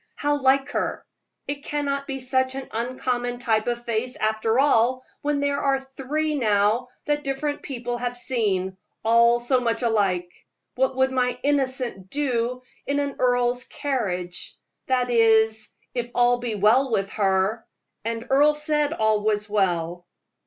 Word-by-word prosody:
How 290 0 0
like 270 +1 +3
her! - - -2 0.4
It 285 0 -4
cannot 280 -2 -2
be 270 -1 -4
such 260 0 +1
an 270 -1 -5
uncommon 245 +1 -2
type 225 -3 0
of 240 0 -2
face, 235 +2 -1
after 220 +1 0
all, 255 -2 +3 0.2
when 290 -1 0
there 285 0 0
are 275 -1 +2
three 270 +4 -3
now 220 -2 +2 0.2
that 295 0 0
different 290 +2 -2
people 245 -3 -4
have 245 0 -3
seen 195 -7 0 0.3
all 235 +1 +5
so 250 +1 +2
much 235 0 -1
alike. 200 -6 +1 0.5
What 265 +1 0
would 260 0 +2
my 250 -1 0
'Innocent' 260 -8 0
do 250 -2 -1 0.2
in 285 +1 +1
an 280 -1 -2
earl's 245 0 +1
carriage? 180 -11 -3 0.3
that 250 -1 +1
is, 220 -1 +3 0.2
if 240 -1 -3
all 245 0 +4
be 240 -3 -3
well 225 +7 +4
with 195 -4 -1
her; 195 +2 +1 0.4
and 230 +1 -3
Earle 290 +3 +4
said 300 0 +1
all 220 -5 +2
was 210 0 0
well." 175 -4 -1
245 Hz, 150 wpm, -24 LUFS, 220-270 Hz, 0.5 s, all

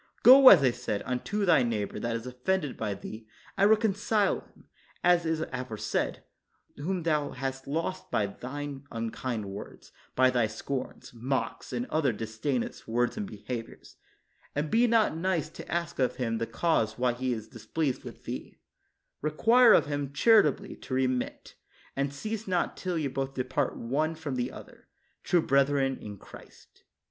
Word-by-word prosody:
Go, 265 +1 +10
as 170 -8 +8
I 130 - +5
said, 105 -3 -3
unto 195 +12 -1
thy 175 - +5
neighbor 110 -4 -2
that 115 0 -2
is 115 +1 -5
offended 135 +5 -1
by 105 -2 -3
thee, 110 +2 -9 0.3
and 200 +1 +4
reconcile 215 -1 +2
him, - - -21 0.4
as 175 -1 +4
is 160 -1 0
aforesaid, 125 -4 -2 0.5
whom 175 +4 -2
thou 150 -3 +1
hast 135 +1 -4
lost 165 +6 -3
by 105 - +1
thine 140 +6 -6
unkind 115 0 -3
words, 100 +1 -9 0.2
by 130 0 +5
thy 120 -3 +2
scorns, 125 +6 -5
mocks 130 +3 -3
and 245 - -2
other 155 -4 +2
disdainous 115 +4 -3
words 120 +2 0
and 210 -2 -4
behaviors; 120 -10 -8 0.6
and 150 +1 -1
be 235 +2 +4
not 225 -7 +3
nice 165 -2 -1
to - - -10
ask 170 -4 -2
of 130 - +1
him 115 -3 -2
the 115 - -2
cause 115 -10 0
why 125 0 +2
he 130 +1 -2
is 110 -3 -4
displeased 135 +3 -3
with - - -10
thee; - - -7 0.6
require 230 +11 +5
of - - +6
him 145 -2 -3
charitably 210 - +4
to 130 - -5
remit; 130 -1 -1 0.4
and 140 0 -1
cease 215 +9 -5
not 180 -2 0
till 180 -2 -3
you 155 -3 0
both 135 0 -3
depart 130 +1 -1
one 150 +7 -1
from 155 -3 -5
the 125 0 -2
other, 240 -2 -13 0.4
true 175 -3 +2
brethren 135 -1 +2
in 105 -1 -8
Christ. - - -16
140 Hz, 160 wpm, -29 LUFS, 125-170 Hz, 0.6 s, Go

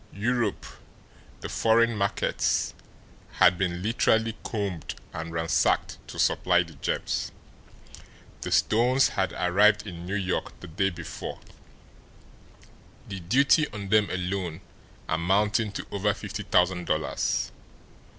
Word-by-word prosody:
Europe, 115 0 -1 0.8
the - - -4
foreign 115 +1 +3
markets, 100 -1 0 0.6
had 90 - +5
been 90 -1 -2
literally 110 0 +2
combed 100 -8 -4 0.2
and 80 +1 -5
ransacked 80 0 +1
to - - -9
supply 90 0 +3
the 85 -1 -13
gems. 70 - -2 1.1
The - - -4
stones 125 +4 +3
had - - -1
arrived 105 +4 +3
in 85 -3 -8
New 95 - -2
York 95 -3 -2
the - - -10
day 95 +4 0
before, 85 - -7 1.7
the 95 -2 -6
duty 140 - +3
on 100 -2 -6
them 105 0 +4
alone 90 -2 -3 0.5
amounting 100 +6 +1
to - - -5
over 100 0 0
fifty - - -6
thousand 90 0 +2
dollars. 75 0 -1
100 Hz, 115 wpm, -27 LUFS, 90-110 Hz, 1.7 s, had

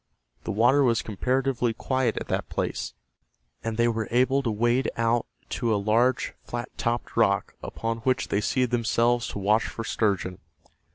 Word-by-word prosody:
The - - -2
water 120 +7 +4
was 115 -3 +2
comparatively 125 +2 0
quiet 130 +1 0
at - - -4
that - - -2
place, - - -3 0.7
and 115 -1 -3
they 120 0 +3
were 110 -2 -1
able 130 +3 +3
to 125 - -1
wade 120 +4 +1
out 115 0 +1 0.2
to 120 -2 -1
a - - +3
large 115 +5 +2
flat 120 +1 -6
topped 120 0 -2
rock - - +2
upon 115 0 -3
which 130 +3 0
they 100 - +1
seated 125 +3 +1
themselves 120 0 +2
to - - -5
watch 105 +3 +2
for 115 - -6
sturgeon. 100 -5 -1
115 Hz, 165 wpm, -26 LUFS, 110-125 Hz, 0.7 s, water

